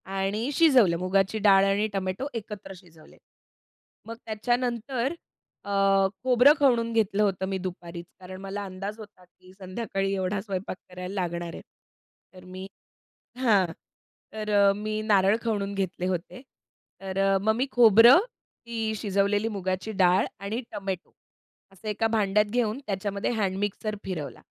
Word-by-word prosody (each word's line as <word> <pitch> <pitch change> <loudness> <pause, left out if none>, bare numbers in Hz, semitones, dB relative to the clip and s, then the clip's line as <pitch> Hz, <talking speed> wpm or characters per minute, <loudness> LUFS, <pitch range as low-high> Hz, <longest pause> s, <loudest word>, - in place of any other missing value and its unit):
आणि 205 +7 -1
शिजवलं. 255 - +5
मुगाची 190 +4 +1
डाळ 195 -1 +6
आणि 200 +2 +1
टोमॅटो 190 +7 -2
एकत्र 210 -3 -8
शिजवले. 165 -3 -18 0.9
मग 230 - -6
त्याच्यानंतर 240 +3 -1 0.5
अ, 200 - -6 0.5
खोबरं 255 +3 +6
खवणून 240 -5 +3
घेतलं 210 -2 +2
होतं 190 -2 0
मी 195 0 -2
दुपारीच, 175 -1 -7
कारण 185 0 -10
मला 195 +1 -5
अंदाज 195 +3 -6
होता 205 -3 -13
की 185 +1 -21
संध्याकाळी 195 +1 -3
एवढा 190 +1 -1
स्वयंपाक 195 -2 -5
करायला 180 +1 -7
लागणार 175 -3 -3
आहे. - - -8 0.7
तर 185 -1 -14
मी 185 +1 -8 0.7
हां, 215 -7 +3 0.7
तर 215 -1 -5 0.2
अ, - - +5
मी 215 +1 -3
नारळ 205 -1 +3
खवणून 200 -3 -2
घेतले 185 -2 -2
होते. 185 +8 -4 0.6
तर 195 0 -5
अ, 195 0 +3
मग 220 +1 +2
मी 260 - 0
खोबरं, 235 - +8 0.5
ती 225 -2 -2
शिजवलेली 205 +1 +1
मुगाची 185 +3 -3
डाळ 180 +1 +4
आणि 205 +4 -3
टोमॅटो, 195 -3 -5 0.6
असं 195 +3 -10
एका 210 +2 0
भांड्यात 210 0 +3
घेऊन 235 -1 0
त्याच्यामध्ये 200 +1 -2
हॅडमिक्सर 205 +2 -2
फिरवला 150 -9 -5
200 Hz, 135 wpm, -26 LUFS, 185-220 Hz, 0.9 s, खोबरं